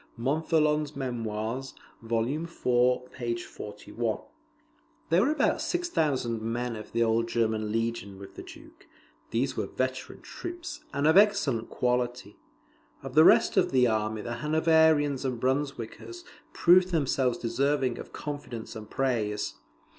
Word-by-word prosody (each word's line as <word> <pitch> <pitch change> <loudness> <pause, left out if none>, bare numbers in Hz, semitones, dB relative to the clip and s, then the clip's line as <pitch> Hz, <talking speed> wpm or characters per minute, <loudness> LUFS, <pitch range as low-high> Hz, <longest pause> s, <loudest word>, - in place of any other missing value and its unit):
[Montholon's 150 +3 +1
Memoirs, 120 -1 -3 0.3
vol. 115 0 0
iv. 155 +5 -3 0.7
p. 120 -1 -1
41.] 110 +2 -4 0.9
There 170 +3 +5
were 250 - +3
about 310 - +1
6,000 150 - 0
men 115 +1 -2
of 110 -1 -9
the 115 0 +2
old 115 0 +1
German 110 -2 0
Legion 115 -3 -2
with 100 0 -11
the - - -8
Duke; - - -14 0.4
these 125 +4 -1
were - - -2
veteran 130 0 -3
troops, 345 -3 -7
and 140 - -1
of 160 +4 +5
excellent 200 - +3
quality. 125 -3 -1 0.6
Of - - -7
the - - +7
rest - - +5
of - - +3
the 130 -2 +4
army 110 -2 0
the 120 0 -4
Hanoverians 155 -1 +3
and 125 -3 -2
Brunswickers 135 - -3 0.3
proved 185 - +5
themselves 135 -6 +1
deserving 135 +1 0
of - - -9
confidence 145 -6 -6
and 110 -1 -8
praise. 110 -6 -1
125 Hz, 130 wpm, -28 LUFS, 115-150 Hz, 0.9 s, the